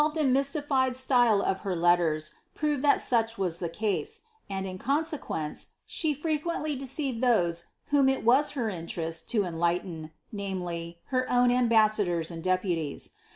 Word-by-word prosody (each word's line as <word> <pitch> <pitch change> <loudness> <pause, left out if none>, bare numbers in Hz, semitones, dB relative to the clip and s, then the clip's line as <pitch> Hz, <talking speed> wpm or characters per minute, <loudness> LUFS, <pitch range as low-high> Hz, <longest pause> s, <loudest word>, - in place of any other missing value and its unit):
The 300 - +4
ioTolTed 310 +1 -6
and 270 -5 +3
m3r8tified 275 -2 +1
style 245 -5 +3
of 190 - 0
her 190 -2 -3
letters 165 -3 +2 0.2
proves 295 -3 -1
tlist 290 - +4
such 230 -1 +1
was 180 -3 -2
the 170 - -2
case; 215 - -2 0.3
and 195 -1 -3
in 185 -1 -6
consequence, 280 - -2 0.2
she 310 -3 -1
frequently 310 0 -2
deceived 270 -2 -2
those 175 -9 +2 0.2
whom 280 -2 +4
it 265 - 0
was 265 +5 +4
her 235 -4 0
interest 165 -3 -4
to 215 -4 +2
enlighten 170 -2 -2
— - - -44
namely, 180 -4 -4 0.2
her 255 0 +1
own 245 0 +4
ambassadors 215 -8 +2
and 165 -1 -7
deputies. 185 -5 -1
220 Hz, 155 wpm, -28 LUFS, 175-270 Hz, 0.3 s, The